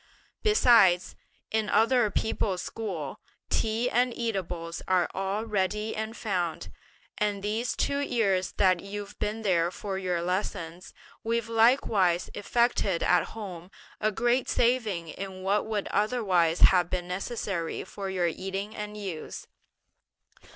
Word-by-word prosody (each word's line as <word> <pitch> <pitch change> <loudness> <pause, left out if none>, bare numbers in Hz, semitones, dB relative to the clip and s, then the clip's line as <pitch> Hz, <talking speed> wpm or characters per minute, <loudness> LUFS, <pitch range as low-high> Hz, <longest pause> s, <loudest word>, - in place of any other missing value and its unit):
Besides, 230 - +5 0.4
in 220 -1 0
other 230 0 +4
people's 195 -2 -1
school, 180 -11 -5 0.3
tea 225 +2 +1
and 250 +1 +2
eatables 180 -7 -3
are 185 -1 +3
all 195 +3 -2
ready 210 +1 -1
and 220 +1 -4
found; 180 -6 -2 0.5
and 205 -2 0
these 220 +4 -1
two 280 0 0
years 205 -9 +1
that 185 -3 +3
you've 200 +2 -7
been 220 +2 -2
there 175 -4 +2
for 190 +1 -4
your 180 -2 -1
lessons, 180 -1 -3 0.3
we've 230 0 0
likewise 225 -6 +3
effected 205 -4 +1
at - - +3
home 180 -5 -7 0.3
a 215 0 +1
great 240 +4 +1
saving 220 -9 +1
in 190 +1 -7
what 200 +3 +1
would 210 -2 -2
otherwise 195 -7 +1
have 180 -2 +6
been 180 -1 -2
necessary 185 -2 -3
for 195 0 -6
your 185 -2 0
eating 195 +5 -3
and 210 0 -6
use. 190 -7 -6
200 Hz, 130 wpm, -28 LUFS, 180-225 Hz, 0.5 s, have